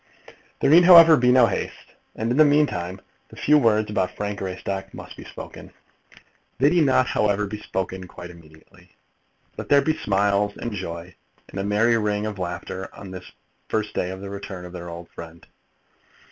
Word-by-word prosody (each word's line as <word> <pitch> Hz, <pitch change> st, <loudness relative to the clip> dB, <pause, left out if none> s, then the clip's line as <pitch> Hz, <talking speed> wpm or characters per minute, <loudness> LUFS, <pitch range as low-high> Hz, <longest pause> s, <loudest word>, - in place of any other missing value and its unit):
There -, -, +3 dB
need, 170 Hz, +2 st, +7 dB
however, 165 Hz, -3 st, +9 dB
be 125 Hz, -3 st, +3 dB
no 125 Hz, -1 st, +6 dB
haste, -, -, -5 dB, 0.2 s
and, 115 Hz, +2 st, -2 dB
in 125 Hz, -, 0 dB
the 155 Hz, -, +8 dB
meantime, 95 Hz, -, +1 dB, 0.3 s
the -, -, -14 dB
few 150 Hz, +1 st, +3 dB
words 110 Hz, -4 st, +2 dB
about 95 Hz, -3 st, 0 dB
Frank 105 Hz, -1 st, -4 dB
Greystock 95 Hz, +1 st, -5 dB
must -, -, -10 dB
be -, -, -11 dB
spoken. -, -, -11 dB, 0.9 s
They 140 Hz, +4 st, +3 dB
need 170 Hz, -3 st, +3 dB
not, 130 Hz, -1 st, +3 dB
however, 105 Hz, -3 st, 0 dB
be 105 Hz, +1 st, -7 dB
spoken 95 Hz, -1 st, -4 dB
quite 90 Hz, 0 st, -10 dB
immediately. 85 Hz, +2 st, -19 dB, 0.6 s
Let -, -, -7 dB
there 140 Hz, -1 st, +5 dB
be 155 Hz, +2 st, 0 dB
smiles, 100 Hz, -1 st, 0 dB
and 120 Hz, -, -5 dB
joy, 90 Hz, -2 st, -7 dB, 0.4 s
and -, -, -7 dB
a -, -, -2 dB
merry 115 Hz, +3 st, +2 dB
ring 105 Hz, -1 st, -1 dB
of 105 Hz, -2 st, -5 dB
laughter 90 Hz, +1 st, -5 dB
on 100 Hz, -2 st, -10 dB
this 90 Hz, -1 st, -9 dB
the -, -, -15 dB, 0.4 s
first 110 Hz, -1 st, -2 dB
day 90 Hz, -, -2 dB
of 95 Hz, 0 st, -7 dB
the 100 Hz, 0 st, -7 dB
return 95 Hz, -2 st, -7 dB
of 90 Hz, -, -11 dB
their 85 Hz, -1 st, -8 dB
old 85 Hz, 0 st, -9 dB
friend. 85 Hz, 0 st, -12 dB
100 Hz, 190 wpm, -23 LUFS, 90-115 Hz, 0.9 s, however